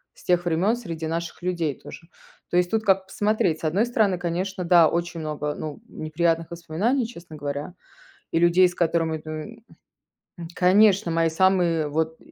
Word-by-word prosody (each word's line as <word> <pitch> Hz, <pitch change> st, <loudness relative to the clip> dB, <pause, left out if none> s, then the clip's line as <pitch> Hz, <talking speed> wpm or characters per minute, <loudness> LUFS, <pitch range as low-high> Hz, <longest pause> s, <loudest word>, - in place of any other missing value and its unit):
с -, -, -18 dB
тех 175 Hz, -1 st, +1 dB
времён, 175 Hz, +7 st, +2 dB
среди 165 Hz, -9 st, -6 dB
наших 170 Hz, +2 st, -4 dB
людей 170 Hz, -5 st, -2 dB
тоже. 165 Hz, -, -12 dB, 0.4 s
То 175 Hz, -, +2 dB
есть 180 Hz, 0 st, +2 dB
тут 220 Hz, +2 st, 0 dB
как 195 Hz, -2 st, +2 dB
посмотреть. 205 Hz, -6 st, 0 dB
С -, -, -19 dB
одной 185 Hz, +9 st, +1 dB
стороны, 210 Hz, -6 st, +1 dB
конечно, 180 Hz, +2 st, -3 dB
да, 170 Hz, -2 st, +6 dB
очень 170 Hz, 0 st, -2 dB
много, 150 Hz, -1 st, -3 dB
ну, 155 Hz, +7 st, -7 dB
неприятных 165 Hz, 0 st, -1 dB
воспоминаний, 185 Hz, -, -1 dB
честно 170 Hz, -8 st, -12 dB
говоря, 145 Hz, +3 st, -5 dB, 0.6 s
и 165 Hz, -, +2 dB
людей, 175 Hz, +2 st, +5 dB
с 175 Hz, -, -9 dB
которыми, 165 Hz, -2 st, 0 dB
ну 155 Hz, 0 st, -5 dB
и 225 Hz, +5 st, -12 dB, 0.8 s
М, 170 Hz, -1 st, -7 dB
конечно! 195 Hz, 0 st, +4 dB
Мои 165 Hz, 0 st, +2 dB
самые 170 Hz, -3 st, +2 dB
вот 160 Hz, +2 st, -1 dB
170 Hz, 170 wpm, -24 LUFS, 160-190 Hz, 0.8 s, да